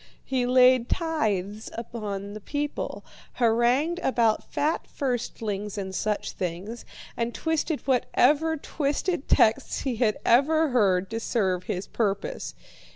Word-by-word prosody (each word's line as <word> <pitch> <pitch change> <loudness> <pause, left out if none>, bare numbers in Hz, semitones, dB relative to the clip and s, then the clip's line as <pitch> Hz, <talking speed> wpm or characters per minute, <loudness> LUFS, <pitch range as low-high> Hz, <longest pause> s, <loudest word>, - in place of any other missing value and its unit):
He 255 -2 0
laid 255 -1 +5
tithes 215 - -1
upon 205 -4 -5
the 215 - -7
people, 290 +5 -4 0.3
harangued 245 +8 +2
about 235 -8 +2
fat 305 +3 0
firstlings 220 -6 -3
and 190 -1 -4
such 210 +2 -1
things, 185 +6 -5 0.3
and 235 0 -2
twisted 320 -1 -1
whatever 290 +4 +2
twisted 295 +2 -2
texts 220 - +3
he 255 -4 -2
had 215 -3 +2
ever 310 +6 +4
heard 195 -6 +2
to 225 - -2
serve 190 -6 0
his 185 +1 -3
purpose. 230 - -2
235 Hz, 120 wpm, -26 LUFS, 210-285 Hz, 0.3 s, laid